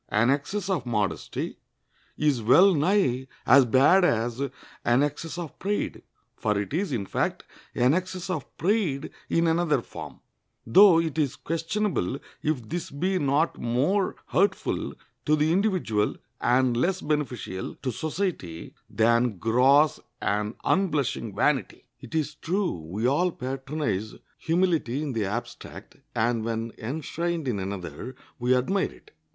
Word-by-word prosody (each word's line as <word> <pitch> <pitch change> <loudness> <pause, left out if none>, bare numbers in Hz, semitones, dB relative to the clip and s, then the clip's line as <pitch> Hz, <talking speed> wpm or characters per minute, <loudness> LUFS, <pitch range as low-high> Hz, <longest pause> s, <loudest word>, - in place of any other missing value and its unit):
An 115 +4 +3
excess 170 +8 -1
of 180 -10 -1
modesty 105 -5 -2 0.6
is 145 -5 +2
well 170 - +6
nigh 145 -6 +2 0.2
as 135 +2 +7
bad 135 +10 +5
as 120 -4 +1 0.4
an 120 +4 +3
excess 150 +3 -3
of 170 -4 -7
pride, 205 +3 -2 0.3
for 105 -2 0
it 100 +6 -4
is, 185 +1 -1
in 110 -6 -1
fact, - - -1 0.3
an 125 +3 +4
excess 185 +1 -2
of 170 -7 -5
pride 175 -6 0 0.2
in 165 0 +2
another 165 -1 +2
form, - - -9 0.5
though 175 - +7
it 160 -2 -1
is 145 -4 +1
questionable 165 - -1 0.2
if 140 -7 -1
this 175 +7 -4
be 185 +6 -1
not 145 +3 +1
more 140 +12 +1
hurtful 200 +2 0 0.3
to 155 - +3
the 155 +1 +2
individual 180 - +1 0.2
and 125 0 +3
less 180 +10 +1
beneficial 130 -11 -3
to 130 - 0
society 155 - -4 0.2
than 115 -1 +2
gross 130 - +4 0.2
and 105 +3 -1
unblushing 145 - 0
vanity. 140 +5 0
It 130 +3 -9
is 155 -1 0
true, 180 +6 -1 0.2
we 105 +6 -2
all 170 +8 +2
patronize 135 - -3 0.2
humility 165 -6 +1
in 145 -4 -3
the 110 -3 0
abstract, 105 +5 -6 0.2
and, 115 0 +1
when 115 0 -2
enshrined 160 +5 -3
in 110 -5 -1
another, 95 +6 -6 0.2
we 125 +1 +3
admire 190 +10 0
it. - - -19
140 Hz, 135 wpm, -26 LUFS, 120-170 Hz, 0.6 s, as